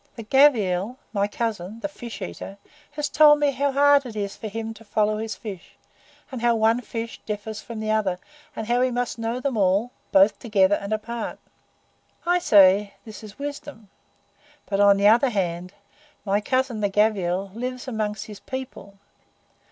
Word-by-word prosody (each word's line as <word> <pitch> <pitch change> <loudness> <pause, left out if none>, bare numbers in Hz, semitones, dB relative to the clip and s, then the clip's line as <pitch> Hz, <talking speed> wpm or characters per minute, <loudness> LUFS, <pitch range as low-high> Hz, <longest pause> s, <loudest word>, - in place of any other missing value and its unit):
The 230 - -7
Gavial, 220 -4 +3 0.2
my 200 -1 +1
cousin, 215 -2 -4
the - - -2
fish 240 -6 -8
eater, 85 - -8 0.4
has 295 0 -2
told 295 +1 +6
me 290 -1 +2
how 280 +1 0
hard 285 +1 +5
it 240 -4 -9
is 200 -1 -3
for 220 - -7
him 225 +1 -5
to 225 0 -15
follow 215 0 0
his 220 0 -4
fish, 195 -6 -9 0.6
and 255 -3 -6
how 235 -1 +3
one 225 +2 +2
fish 230 -1 -6
differs 210 0 -5
from 230 -2 -8
the 215 0 -2
other, 205 -4 0 0.4
and 220 - -4
how 240 +2 +1
he 255 - +3
must 245 -1 -3
know 230 +2 -2
them 265 -3 -2
all, 200 +4 +2 0.2
both 195 +2 +5
together 205 -5 +2
and 200 0 -2
apart. 225 +2 -4 0.9
I 350 +1 +3
say 200 - +5
that 220 0 -10
is 210 -1 -11
wisdom; 285 -6 -7 0.8
but, 200 -1 -2
on 200 -1 +6
the 200 +1 +4
other 240 +5 +5
hand, 180 -3 -3 0.5
my 200 +1 +1
cousin, 255 0 -1
the 205 - +1
Gavial, 195 -2 0
lives 250 +3 -5
among 215 -4 -2
his 210 -1 -9
people. 250 -7 -8
220 Hz, 175 wpm, -24 LUFS, 200-245 Hz, 0.9 s, told